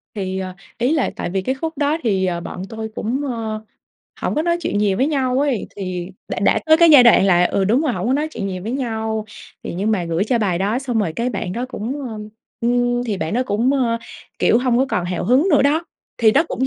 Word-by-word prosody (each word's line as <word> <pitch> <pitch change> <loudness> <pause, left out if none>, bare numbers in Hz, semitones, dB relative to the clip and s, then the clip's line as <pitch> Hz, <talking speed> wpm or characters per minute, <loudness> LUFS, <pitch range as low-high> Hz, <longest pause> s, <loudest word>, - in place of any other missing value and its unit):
Thì, 190 -2 -3
ờ, 185 -1 -5 0.2
ý 250 +6 +1
là 305 - +1
tại - - -4
vì 190 +1 -1
cái 260 +8 -1
khúc 320 +3 -5
đó 295 +2 +1
thì, 195 -5 +1
ờ, 175 -2 -1
bọn 180 - -7
tôi 220 -1 -5
cũng, 250 +6 -2
ơ, 220 -2 -4 0.6
hổng - - -1
có 305 - +1
nói 340 0 +1
chuyện 260 - -1
nhiều 205 -2 +2
với 265 +7 +2
nhau 265 -4 0
ấy, 280 -7 0
thì 185 -3 -4 0.2
đã - - -3
đã 200 - +3
tới 315 0 +7
cái 335 0 +6
giai 285 -5 +9
đoạn 235 -5 +6
là 180 -2 +4
ừ, 195 +2 +1
đúng 230 +8 +3
rồi, 295 -6 0
hổng - - -3
có 255 - +2
nói 300 +3 0
chuyện 200 - -4
nhiều 185 -2 -4
với 225 - -4
nhau. 220 -4 -2 0.4
Thì - - -5
nhưng 200 +5 -1
mà 190 -5 0
gửi 165 +4 0
cho 240 +1 +1
bài 190 -6 0
đó 205 +5 0
xong 250 -4 -2
rồi 180 -7 0
cái 245 +2 0
bạn 190 -4 -4
đó 240 +5 -3
cũng, 260 +4 -4
ơm, 215 -2 -7 0.3
ưm, 245 +1 +1
thì 215 -4 -2
bạn 160 +1 -3
đó 250 - +2
cũng, 230 +5 +1
ơ, 240 -4 +1 0.4
kiểu, 230 - +4
hông 245 -1 +1
có 265 - +2
còn 180 -7 -1
hào 180 0 -3
hứng 260 - +3
nữa 290 - +5
đó, 305 +4 +2 0.3
thì 220 -2 +5
nó 290 - +4
cũng, 260 - -1
230 Hz, 260 wpm, -20 LUFS, 195-265 Hz, 0.6 s, giai